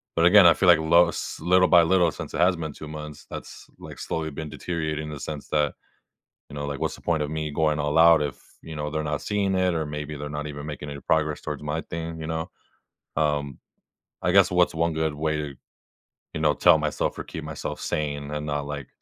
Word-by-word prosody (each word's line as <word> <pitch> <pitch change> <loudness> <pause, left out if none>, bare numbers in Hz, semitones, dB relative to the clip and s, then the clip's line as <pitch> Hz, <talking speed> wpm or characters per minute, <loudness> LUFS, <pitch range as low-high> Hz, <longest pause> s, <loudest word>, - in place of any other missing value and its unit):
but, 85 - +3
again, 90 0 +8
I 85 - +8
feel 95 - +1
like 85 -2 +7
lo 85 +2 +5
s - - -5
little 90 +1 +4
by 85 -2 +6
little 90 0 +3
since - - -8
it - - -3
has 90 +1 +4
been 80 -3 -5
2 75 - -9
months, 75 -1 -8
that's, - - -9
like, - - -10
slowly 80 -1 -3
been 75 +2 -6
deteriorating 80 -3 -3
in - - -6
the 75 - -7
sense 75 -1 -6
that, 75 -2 +1 0.7
you - - -12
know, 70 - -4
like, 70 -1 -4
what's - - -1
the - - -16
point 80 -3 0
of 75 - -4
me 80 -1 -2
going 75 0 +1
all 75 +2 0
out 80 -1 +7
if, 75 -2 -4 0.2
you 80 - -9
know, 75 0 -3
they're 80 0 -2
not 75 -1 -2
seeing 100 -2 0
it 90 -1 +2
or 80 -2 -1
maybe 75 0 -5
they're 75 - -5
not 75 +1 -4
even 70 0 -7
making 75 -1 -6
any 70 0 -7
progress 75 -1 +1
towards - - -5
my 75 +2 -2
thing, 80 0 -6
you 80 - -5
know? 80 +2 -3 0.7
Um, 75 -3 0 0.6
I 90 - +1
guess 100 -1 +5
what's 90 -2 +3
1 85 +1 +1
good 80 -1 -1
way 75 0 -1
to, 75 -3 -5 0.8
you - - -4
know, 75 -1 +4
tell 85 +2 +5
myself 75 -1 -2
or - - -3
keep 80 - -7
myself 80 -2 -5
sane 75 -1 -3
and 75 0 -3
not, 75 -1 -2
like, 70 -3 -5
75 Hz, 235 wpm, -25 LUFS, 75-85 Hz, 0.8 s, again